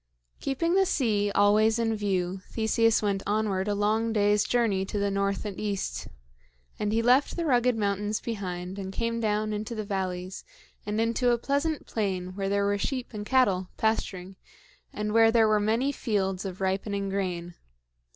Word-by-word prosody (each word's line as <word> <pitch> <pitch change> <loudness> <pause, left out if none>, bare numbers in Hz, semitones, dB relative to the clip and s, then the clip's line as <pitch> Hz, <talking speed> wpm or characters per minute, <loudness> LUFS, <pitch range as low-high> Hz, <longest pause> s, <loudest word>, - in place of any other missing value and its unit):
Keeping 335 +6 0
the 385 0 +4
sea 215 - +1
always 215 +2 +4
in 225 -1 0
view, 190 -3 -1
Theseus 225 0 +2
went 200 -2 0
onward 205 -2 0
a 205 - 0
long 215 +3 +1
day's 205 -1 +3
journey 225 -6 +1
to 195 - -4
the 200 0 0
north 200 +1 -1
and 200 -2 -5
east; 195 - -3 0.7
and 210 0 0
he 225 +1 +1
left 255 +4 +3
the 340 - -2
rugged 250 -4 +3
mountains 205 0 -1
behind 185 -4 -5
and 190 -1 -5
came 230 +3 -2
down 215 -1 0
into 215 +3 -4
the 215 - -3
valleys 185 -2 -4 0.4
and 210 +1 -1
into 230 +2 +1
a 240 - +3
pleasant 285 +5 -1
plain 185 -4 -3
where 195 -1 -2
there 200 0 +1
were 205 0 +1
sheep 255 +2 -3
and 210 -1 -6
cattle 195 -9 +2
pasturing 190 -4 -1 0.5
and 210 0 -3
where 225 0 +6
there 225 -1 +4
were 215 -1 +3
many 225 +6 +1
fields 195 -7 -1
of 190 0 -6
ripening 195 +1 -1
grain. 180 -3 -3
210 Hz, 170 wpm, -27 LUFS, 195-225 Hz, 0.7 s, where